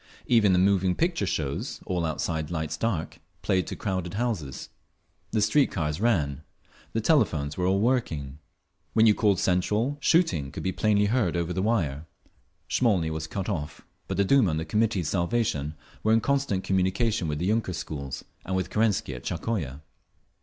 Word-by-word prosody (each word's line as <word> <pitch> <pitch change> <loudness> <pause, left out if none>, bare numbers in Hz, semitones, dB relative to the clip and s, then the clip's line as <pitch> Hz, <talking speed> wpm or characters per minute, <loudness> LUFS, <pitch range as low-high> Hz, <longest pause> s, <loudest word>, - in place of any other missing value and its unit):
Even 115 -5 +4
the 90 - +4
moving 95 -1 +3
picture 170 0 0
shows, 70 -3 -2
all 90 -3 -1
outside 80 0 -2
lights 80 -2 -2
dark, 90 -3 -2 0.2
played 95 -3 +1
to - - -4
crowded 95 -2 -3
houses. 100 - -3 0.6
The 110 -2 +1
street 135 +7 +3
cars 75 +2 -2
ran. 75 - +1 0.5
The 115 - 0
telephones 85 - +2
were 90 0 0
all 95 +1 +2
working; 80 - -1 0.5
when 110 0 +5
you 110 - +7
called 100 -4 +2
Central, 105 +10 +1
shooting 90 - +2
could - - -6
be 95 - 0
plainly 105 +1 +2
heard 105 -6 +1
over 85 +1 -1
the 95 - -1
wire…. 85 -9 0 0.6
Smolny 95 -10 +2
was 80 0 -4
cut 95 +2 -4
off, 80 -6 -4 0.3
but - - -3
the 100 - +3
Duma 125 -2 +4
and 80 -1 -1
the 80 - -3
Committee 105 +2 +1
for 75 - -2
Salvation 85 -6 0 0.3
were 110 - +3
in 115 - +5
constant 135 -7 0
communication 95 +1 +1
with 75 - -1
all - - -5
the 90 - +1
yunker 110 -4 0
schools 70 -5 -6 0.2
and 95 - -3
with 95 - -2
Kerensky 105 -10 +1
at 60 -1 -8
Tsarskoye. 75 - -3
95 Hz, 175 wpm, -27 LUFS, 80-110 Hz, 0.6 s, you